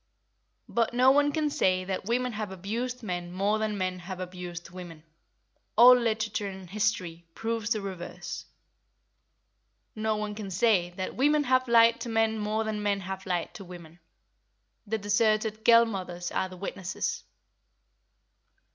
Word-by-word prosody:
But 235 Hz, +1 st, 0 dB
no 255 Hz, +2 st, +6 dB
one 290 Hz, +1 st, +4 dB
can 300 Hz, -1 st, 0 dB
say 185 Hz, -7 st, +2 dB
that 190 Hz, 0 st, -4 dB
women 250 Hz, +3 st, 0 dB
have 210 Hz, -2 st, -4 dB
abused 230 Hz, +7 st, -4 dB
men 175 Hz, -3 st, -4 dB
more 200 Hz, +4 st, +1 dB
than 215 Hz, -1 st, -1 dB
men 185 Hz, -1 st, -2 dB
have 180 Hz, +1 st, -7 dB
abused 180 Hz, -1 st, -7 dB
women—all 175 Hz, +7 st, +1 dB
literature 220 Hz, -3 st, -1 dB
and 190 Hz, -1 st, -8 dB
history 185 Hz, -4 st, -2 dB
proves 225 Hz, -2 st, -2 dB
the 215 Hz, -2 st, +1 dB
reverse. 180 Hz, -2 st, -7 dB, 1.5 s
No 215 Hz, 0 st, 0 dB
one 210 Hz, 0 st, -3 dB
can 205 Hz, -2 st, -6 dB
say 190 Hz, -2 st, +2 dB
that 185 Hz, -, -3 dB
women 295 Hz, +3 st, +3 dB
have 255 Hz, -1 st, +2 dB
lied 230 Hz, 0 st, +5 dB
to 235 Hz, -, -5 dB
men 225 Hz, -1 st, +1 dB
more 215 Hz, +1 st, -1 dB
than 215 Hz, -1 st, -3 dB
men 200 Hz, -1 st, 0 dB
have 190 Hz, 0 st, -6 dB
lied 175 Hz, -2 st, -2 dB
to 215 Hz, -, -9 dB
women; 175 Hz, -2 st, -12 dB, 0.9 s
the 220 Hz, +2 st, 0 dB
deserted 215 Hz, +1 st, +1 dB
girl 235 Hz, 0 st, +7 dB
mothers 180 Hz, -5 st, -5 dB
are 190 Hz, -, -1 dB
the 185 Hz, -, -10 dB
witnesses. 190 Hz, -1 st, -4 dB
210 Hz, 145 wpm, -28 LUFS, 185-225 Hz, 1.5 s, girl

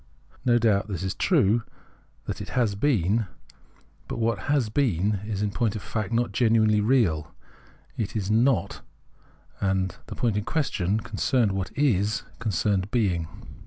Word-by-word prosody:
No 120 Hz, -2 st, +4 dB
doubt 110 Hz, -3 st, +2 dB
this 95 Hz, -4 st, -4 dB
is 95 Hz, 0 st, -1 dB
true, 120 Hz, -, +3 dB, 0.6 s
that -, -, -4 dB
it -, -, -7 dB
has 115 Hz, -5 st, +2 dB
been; 105 Hz, -, +1 dB, 0.8 s
but -, -, -4 dB
what 115 Hz, -2 st, 0 dB
has 135 Hz, -7 st, +2 dB
been 105 Hz, -, +1 dB
is 105 Hz, -2 st, -2 dB
in 105 Hz, -, -1 dB
point 115 Hz, -1 st, 0 dB
of 105 Hz, -, -4 dB
fact 110 Hz, -2 st, -3 dB
not 120 Hz, -1 st, +1 dB
genuinely 110 Hz, -1 st, +3 dB
real, 105 Hz, -, +1 dB, 0.6 s
it 110 Hz, -1 st, -3 dB
is 105 Hz, -2 st, -1 dB
not, 115 Hz, -3 st, +2 dB, 0.8 s
and 95 Hz, -2 st, 0 dB
the -, -, -7 dB
point 115 Hz, -4 st, 0 dB
in 105 Hz, -, -1 dB
question 110 Hz, -, -1 dB
concerned 120 Hz, 0 st, +1 dB
what 95 Hz, -1 st, -3 dB
is, 110 Hz, -7 st, +1 dB, 0.2 s
concerned 100 Hz, -2 st, 0 dB
being. 95 Hz, -9 st, 0 dB
105 Hz, 150 wpm, -26 LUFS, 100-120 Hz, 0.8 s, No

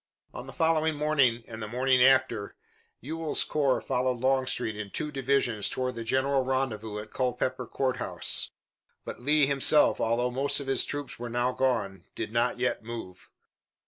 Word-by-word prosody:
On 125 Hz, -, -8 dB
the -, -, -8 dB
following 160 Hz, 0 st, +1 dB
morning 140 Hz, -6 st, +2 dB
and 115 Hz, -1 st, -8 dB
the 110 Hz, -, -4 dB
morning 125 Hz, +2 st, +2 dB
after, 125 Hz, -5 st, +3 dB, 0.5 s
Ewell's 160 Hz, +4 st, 0 dB
corps 140 Hz, -4 st, +1 dB
followed 130 Hz, -1 st, -1 dB
Longstreet 130 Hz, -4 st, 0 dB
in 105 Hz, -1 st, -6 dB
two 150 Hz, +8 st, -4 dB
divisions 135 Hz, -6 st, 0 dB
toward 130 Hz, 0 st, -2 dB
the 115 Hz, -1 st, -6 dB
general 130 Hz, +3 st, +1 dB
rendezvous 120 Hz, -5 st, -2 dB
at 105 Hz, 0 st, -8 dB
Culpeper 130 Hz, -1 st, -2 dB
Court 130 Hz, -2 st, -1 dB
House, -, -, +1 dB, 0.6 s
but -, -, -7 dB
Lee 150 Hz, +2 st, +4 dB
himself, 140 Hz, +2 st, +4 dB
although 120 Hz, +2 st, +1 dB
most 135 Hz, +4 st, +1 dB
of 140 Hz, -, -6 dB
his 135 Hz, -1 st, +2 dB
troops 145 Hz, -5 st, -6 dB
were 120 Hz, 0 st, -5 dB
now 120 Hz, +1 st, 0 dB
gone, 100 Hz, -9 st, -1 dB
did 110 Hz, -1 st, -5 dB
not 120 Hz, +1 st, +1 dB
yet 125 Hz, -2 st, -1 dB
move. 110 Hz, -6 st, -8 dB
130 Hz, 165 wpm, -28 LUFS, 115-135 Hz, 0.6 s, Lee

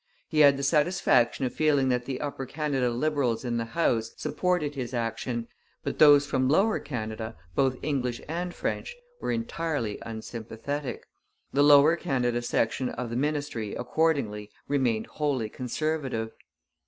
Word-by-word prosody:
He 155 Hz, -, 0 dB
had 140 Hz, -2 st, +7 dB
the 140 Hz, -, -4 dB
satisfaction 140 Hz, -5 st, +3 dB
of 125 Hz, -, -3 dB
feeling 145 Hz, -4 st, +2 dB
that 125 Hz, -1 st, 0 dB
the 130 Hz, -1 st, -4 dB
Upper 140 Hz, -3 st, -4 dB
Canada 140 Hz, -4 st, 0 dB
Liberals 125 Hz, -2 st, 0 dB
in 120 Hz, -1 st, -1 dB
the 115 Hz, -, -1 dB
House 115 Hz, -9 st, +1 dB
supported 155 Hz, 0 st, 0 dB
his 130 Hz, -3 st, -4 dB
action, 115 Hz, +1 st, -2 dB, 0.4 s
but -, -, -4 dB
those 145 Hz, -2 st, +8 dB
from 130 Hz, -3 st, +1 dB
Lower 195 Hz, +9 st, +3 dB
Canada, 110 Hz, -3 st, -5 dB, 0.2 s
both 130 Hz, +4 st, +2 dB
English 125 Hz, -5 st, -1 dB
and 175 Hz, +3 st, -3 dB
French, 485 Hz, -, -3 dB, 0.2 s
were -, -, -2 dB
entirely 165 Hz, -, -2 dB
unsympathetic. 115 Hz, +4 st, -5 dB, 0.5 s
The 140 Hz, -, +3 dB
Lower 145 Hz, +2 st, +7 dB
Canada 125 Hz, -8 st, 0 dB
section 120 Hz, +1 st, 0 dB
of 125 Hz, -2 st, -5 dB
the -, -, -3 dB
ministry 145 Hz, -6 st, -2 dB
accordingly 125 Hz, -7 st, 0 dB, 0.2 s
remained 125 Hz, -6 st, +1 dB
wholly 140 Hz, -7 st, -1 dB
Conservative. 130 Hz, -2 st, -2 dB
135 Hz, 140 wpm, -27 LUFS, 120-150 Hz, 0.5 s, those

